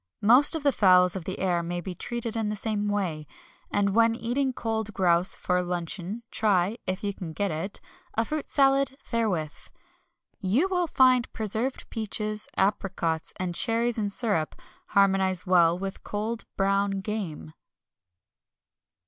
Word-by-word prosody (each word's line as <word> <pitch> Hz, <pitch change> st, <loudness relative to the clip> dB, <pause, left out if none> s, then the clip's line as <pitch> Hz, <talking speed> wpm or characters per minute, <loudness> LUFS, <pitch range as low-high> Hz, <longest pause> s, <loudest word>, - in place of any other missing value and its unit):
Most 250 Hz, +9 st, +6 dB
of 320 Hz, -, -3 dB
the 285 Hz, -, +4 dB
fowls 180 Hz, -5 st, +4 dB
of 185 Hz, -4 st, -5 dB
the 190 Hz, -, -4 dB
air 180 Hz, -2 st, 0 dB
may 175 Hz, +1 st, -4 dB
be 180 Hz, +2 st, -6 dB
treated 235 Hz, +5 st, -4 dB
in 220 Hz, -2 st, -1 dB
the 210 Hz, -, -2 dB
same 210 Hz, 0 st, -1 dB
way. 180 Hz, -8 st, -2 dB, 0.4 s
And 200 Hz, -1 st, +1 dB
when 230 Hz, +1 st, +4 dB
eating 255 Hz, +4 st, -1 dB
cold 220 Hz, -3 st, -3 dB
grouse 175 Hz, -1 st, +5 dB
for 180 Hz, 0 st, 0 dB
luncheon 180 Hz, +4 st, -4 dB
try 205 Hz, +1 st, +1 dB
(if 185 Hz, +3 st, -2 dB
you 200 Hz, -1 st, -1 dB
can 170 Hz, -4 st, -7 dB
get 200 Hz, +2 st, -1 dB
it) 165 Hz, +6 st, -3 dB, 0.4 s
a 225 Hz, -, +1 dB
fruit 305 Hz, +1 st, -4 dB
salad 275 Hz, -1 st, +2 dB
therewith. 190 Hz, -10 st, -1 dB, 0.9 s
You 230 Hz, -, +1 dB
will 360 Hz, -2 st, 0 dB
find 255 Hz, -4 st, +3 dB
preserved 220 Hz, +5 st, -2 dB
peaches, 215 Hz, -1 st, -2 dB
apricots, 190 Hz, -5 st, 0 dB
and 185 Hz, -1 st, -2 dB
cherries 230 Hz, +4 st, 0 dB
in 205 Hz, -1 st, -1 dB
syrup, 200 Hz, -7 st, -1 dB, 0.3 s
harmonise 190 Hz, -2 st, +2 dB
well 175 Hz, -2 st, +4 dB
with 195 Hz, +1 st, -6 dB
cold 220 Hz, +2 st, -4 dB
brown 195 Hz, 0 st, +1 dB
game. 185 Hz, -, -5 dB
205 Hz, 150 wpm, -26 LUFS, 180-230 Hz, 0.9 s, Most